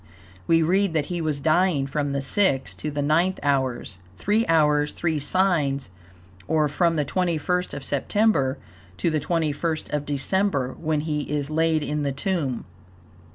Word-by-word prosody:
We 165 -1 +4
read 185 +1 +1
that 150 -2 +1
he 175 - -2
was 155 -3 -1
dying 160 -1 +2
from 145 +1 -2
the 140 0 -2
sixth 140 -3 +1
to 155 - -3
the 145 -1 -2
ninth 170 +6 +2
hours 130 -9 -1 0.2
three 215 +3 +1
hours, 150 -2 +3
three 160 -3 -1
signs, 145 - 0 0.6
or 155 -1 +2
from 165 +3 +1
the 150 -2 0
21st 180 +1 -1
of 140 - -6
September 140 -1 +1 0.4
to 170 - 0
the 155 - +1
21st 160 0 -2
of 145 -1 -2
December, 145 -1 0
when 155 -2 0
he 150 -1 -2
is 145 0 -2
laid 160 0 +1
in 150 0 -2
the 140 -1 -1
tomb. 140 -4 -2
155 Hz, 155 wpm, -24 LUFS, 140-170 Hz, 0.6 s, We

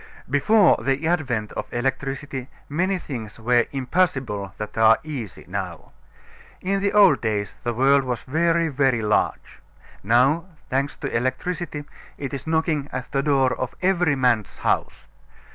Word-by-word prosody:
Before 175 - +4
the 135 +4 0
advent 130 - -1
of - - -6
electricity 135 +1 -3 0.2
many 185 +6 0
things 115 -11 -7
were 120 +1 +2
impossible 130 - -1
that 105 - -6
are 110 0 +6
easy 135 - -7
now. - - -5 0.7
In 195 +2 0
the 200 0 +1
old 205 -3 +6
days 105 -3 -2
the 120 - -1
world 135 +3 +4
was 125 -2 -3
very, 165 +3 +1
very 135 -5 +1
large; 105 0 0 0.4
now, 130 - +3 0.3
thanks 135 +2 0
to - - -5
electricity, 145 +5 -2 0.3
it 140 -1 -5
is 140 - -6
knocking 160 -3 0
at 130 - -5
the 135 - +1
door 135 -3 +2
of 130 -1 -4
every 175 -5 +3
man's 125 -6 +1
house. - - -1
135 Hz, 145 wpm, -23 LUFS, 120-160 Hz, 0.7 s, are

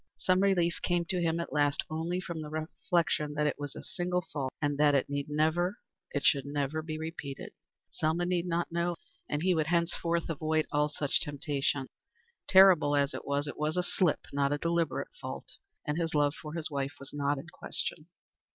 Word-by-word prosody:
Some 185 0 +2
relief 175 -4 +2
came 175 -1 +1
to 180 -3 +1
him 165 0 +1
at 170 - -4
last 145 -2 +2
only 165 +3 -2
from 170 -3 -5
the 150 - -6
reflection 155 -1 0
that 150 0 +1
it 150 - 0
was 145 -1 -5
a - - -7
single 180 0 -1
fault, 135 -3 -2
and 145 -2 0
that 145 -1 +5
it 140 +1 +1
need 140 +1 -2
never 160 +6 +1 0.3
it 145 - -2
should 140 -2 +4
never 145 +2 -1
be 155 0 -4
repeated. 160 -3 -6 0.4
Selma 160 +3 0
need 180 0 0
not 170 0 -1
know, 170 +1 0 0.3
and 150 +2 -1
he 185 0 +4
would 155 -3 +1
henceforth 170 0 +1
avoid 155 0 0
all 150 0 +2
such 145 -1 0
temptations. 145 -3 -1 0.6
Terrible 185 -6 +7
as 140 0 +2
it - - -7
was, 140 +1 +1
it 145 - -6
was 155 +2 0
a 180 - +2
slip, 175 -2 +2
not 140 0 +2
a 145 - +1
deliberate 170 +1 -1
fault, - - -7 0.3
and 150 +3 -1
his 165 -2 -1
love 145 -1 +3
for 150 -1 -8
his 160 -2 0
wife 140 0 -2
was 140 0 -9
not 145 0 0
in 135 - -7
question. 155 0 -4
155 Hz, 195 wpm, -31 LUFS, 145-170 Hz, 0.6 s, Terrible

